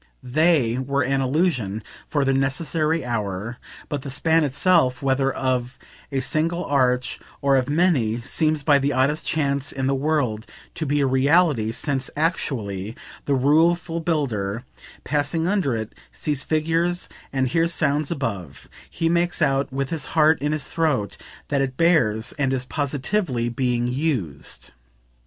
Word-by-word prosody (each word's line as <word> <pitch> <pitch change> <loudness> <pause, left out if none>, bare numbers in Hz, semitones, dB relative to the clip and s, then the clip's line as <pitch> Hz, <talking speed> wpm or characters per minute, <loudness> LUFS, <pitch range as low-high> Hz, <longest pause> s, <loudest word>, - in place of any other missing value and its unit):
THEY 130 -3 +2
were 140 +1 0
an 135 +2 +1
illusion, 130 - 0 0.2
for 145 -2 0
their 135 - +2
necessary 155 +3 0
hour; 105 -1 -3 0.3
but 145 -2 -3
the 140 - -7
span 160 +4 +2
itself, 145 -2 +2
whether 135 0 +2
of 130 -1 -2 0.3
a 135 -1 0
single 165 +6 0
arch 125 -3 +1 0.2
or 140 -1 +3
of 130 0 +1
many, 145 -9 +2
seems 155 +3 0
by 145 0 +5
the 140 +1 0
oddest 135 +4 +1
chance 140 -3 0
in 135 -1 -3
the 135 - +2
world 135 -6 0 0.3
to 160 - -4
be 145 +1 +1
a - - +3
reality; 135 -3 +3
since, 135 +2 -2
actually, 110 - -1 0.3
the 140 - +2
rueful 165 +5 +2
builder, 125 - -1 0.4
passing 150 +3 -1
under 185 - +1
it, 110 -1 -5 0.2
sees 145 -2 -2
figures 165 +3 0 0.2
and 130 -2 0
hears 165 +4 +1
sounds 150 -2 +1
above: 100 - -4 0.2
he 165 - -1
makes 175 +1 +1
out, 135 -4 +1
with 135 0 -3
his 160 -3 -2
heart 155 -1 +5
in 145 +1 0
his 155 -1 -2
throat, 145 - 0 0.3
that 140 -2 +1
it 130 -1 -2
bears 125 -11 +2
and 135 -1 +1
is 130 -1 -2
positively 140 - -1
being 120 0 0
"used." 125 - -3
140 Hz, 150 wpm, -23 LUFS, 125-155 Hz, 0.4 s, by